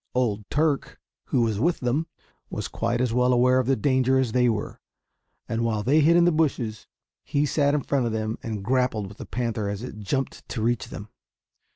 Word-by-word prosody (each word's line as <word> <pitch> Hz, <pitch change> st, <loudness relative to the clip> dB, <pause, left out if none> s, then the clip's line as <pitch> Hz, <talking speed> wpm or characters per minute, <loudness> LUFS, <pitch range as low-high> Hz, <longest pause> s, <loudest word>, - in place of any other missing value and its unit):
Old 110 Hz, -5 st, 0 dB
Turk, 150 Hz, -2 st, 0 dB, 0.3 s
who 120 Hz, -, +1 dB
was 110 Hz, -3 st, 0 dB
with 170 Hz, +8 st, +1 dB
them, 135 Hz, +6 st, 0 dB, 0.4 s
was -, -, -4 dB
quite 115 Hz, +1 st, -1 dB
as 125 Hz, -2 st, 0 dB
well 125 Hz, +1 st, +3 dB
aware 125 Hz, +1 st, +4 dB
of 130 Hz, -, -1 dB
the 135 Hz, -, +3 dB
danger 130 Hz, +2 st, +2 dB
as 130 Hz, -3 st, +1 dB
they 125 Hz, +1 st, +3 dB
were; 110 Hz, -2 st, -3 dB, 0.7 s
and 115 Hz, 0 st, -1 dB
while 110 Hz, -2 st, 0 dB
they 145 Hz, +7 st, +4 dB
hid 160 Hz, +3 st, +5 dB
in 170 Hz, -, +5 dB
the 175 Hz, -, +4 dB
bushes, 130 Hz, -9 st, -1 dB, 0.4 s
he 145 Hz, +2 st, 0 dB
sat 145 Hz, 0 st, +2 dB
in 150 Hz, -, +1 dB
front 135 Hz, -4 st, 0 dB
of -, -, -2 dB
them 110 Hz, 0 st, -2 dB
and 110 Hz, -3 st, -5 dB
grappled 125 Hz, -4 st, +1 dB
with 100 Hz, +2 st, -11 dB
the -, -, -7 dB
panther 115 Hz, -4 st, -2 dB
as 100 Hz, +2 st, -4 dB
it 115 Hz, -4 st, -7 dB
jumped 135 Hz, +7 st, -3 dB
to 110 Hz, -, -3 dB
reach 120 Hz, -1 st, 0 dB
them. 105 Hz, +1 st, -9 dB
125 Hz, 210 wpm, -25 LUFS, 110-135 Hz, 0.7 s, hid